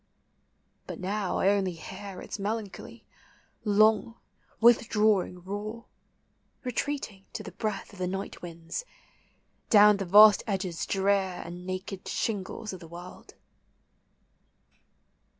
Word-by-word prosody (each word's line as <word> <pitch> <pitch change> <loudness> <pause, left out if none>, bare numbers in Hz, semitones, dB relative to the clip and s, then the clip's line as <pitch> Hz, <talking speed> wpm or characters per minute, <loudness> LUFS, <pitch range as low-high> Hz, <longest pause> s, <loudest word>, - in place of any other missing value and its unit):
But - - -6
now 195 +1 -2
I 190 - +3
only 195 -3 +1
hear 190 +3 -8
Its - - -6
melancholy, 210 0 -5 0.6
long, 215 +1 +3 0.4
withdrawing 215 -6 +3
roar, 210 +4 -5 0.8
Retreating, 250 -5 -3
to - - -5
the 190 - -8
breath 210 +2 -4
Of 200 - -13
the 180 - -1
night 195 +2 -5
winds, 165 - -6 0.9
down 210 -2 +7
the 195 - -3
vast 210 +3 +8
edges 190 -5 -2
drear 195 -2 +1
And 175 +1 -8
naked 185 +1 -5
shingles 210 0 -3
of 185 - -7
the 165 - -11
world. 175 +2 -11
195 Hz, 115 wpm, -28 LUFS, 185-215 Hz, 0.9 s, vast